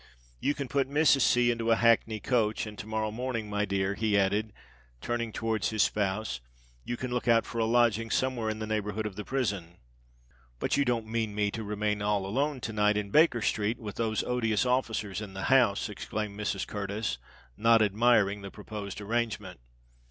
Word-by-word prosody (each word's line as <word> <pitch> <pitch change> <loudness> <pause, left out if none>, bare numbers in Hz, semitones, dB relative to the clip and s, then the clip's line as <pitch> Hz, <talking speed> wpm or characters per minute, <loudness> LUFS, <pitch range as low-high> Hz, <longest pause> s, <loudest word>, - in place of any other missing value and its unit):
"You 145 - 0
can 140 -2 -4
put 135 0 0
Mrs. 145 -1 +4
C. 120 0 +4
into 115 -1 -2
a 115 - +6
hackney 115 -1 +3
coach; 110 -1 0
and 105 -1 -8
to 110 - -7
morrow 110 0 -1
morning, 115 -2 -3
my 105 0 0
dear," 95 0 0
he 105 0 +1
added, 100 +2 +1 0.5
turning 115 - -2
towards 110 -1 -1
his 110 -2 +2
spouse, 105 - -1 0.4
"you 120 - -4
can 130 0 -4
look 125 0 -2
out 115 -1 +4
for 115 - -5
a 115 - +2
lodging 115 -1 +2
somewhere 125 -4 0
in 110 - -3
the 110 - -4
neighbourhood 105 0 -2
of 105 -3 -4
the 105 - -5
prison." 100 -11 -2 0.8
"But - - 0
you 140 - +3
don't 120 -3 0
mean 110 -2 -2
me 105 -1 +1
to 110 - -5
remain 105 0 -1
all 105 -1 0
alone 135 +6 -1
to 115 - -4
night 105 0 +2
in 100 -1 -3
Baker 150 -6 +4
Street, 105 +3 0
with 105 -3 -8
those 110 -2 0
odious 115 -2 0
officers 110 -5 -1
in 100 -3 -8
the 95 - -4
house?" 120 -7 +4
exclaimed 105 -1 -5
Mrs. 105 -2 -2
Curtis, 105 - -3 0.4
not 115 0 +5
admiring 105 -1 +3
the 100 - -7
proposed 105 -1 -7
arrangement. 105 -4 -2
110 Hz, 190 wpm, -29 LUFS, 105-120 Hz, 0.8 s, a